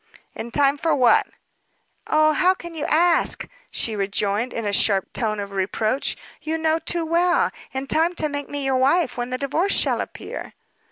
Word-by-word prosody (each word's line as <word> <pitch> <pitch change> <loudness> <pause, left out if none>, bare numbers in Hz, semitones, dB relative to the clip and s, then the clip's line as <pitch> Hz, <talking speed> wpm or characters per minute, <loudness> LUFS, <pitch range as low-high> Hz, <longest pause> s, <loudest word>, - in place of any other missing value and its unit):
"In 235 - -6
time 280 +2 +2
for 325 +1 +2
what?" 250 -4 +4 0.8
"Oh, 310 0 +4
how 370 +3 +3
can 345 -2 -9
you 310 -2 -4
ask?" 335 +2 +2 0.2
she 225 - -2
rejoined, 205 +3 -1
in 230 - -4
a 205 - -1
sharp 195 -1 +2
tone 215 -3 -1
of 200 0 -5
reproach; 215 +6 -1 0.2
"you 315 +1 -2
know 320 0 +1
too 340 0 -1
well. 345 +2 +2 0.2
In 265 0 -4
time 330 +5 +1
to 310 - 0
make 285 -1 -5
me 285 -1 -3
your 265 -1 +2
wife 280 +4 +2
when 245 0 -3
the 255 - -2
divorce 310 +9 0
shall - - +1
appear." - - -7
280 Hz, 180 wpm, -22 LUFS, 230-325 Hz, 0.8 s, what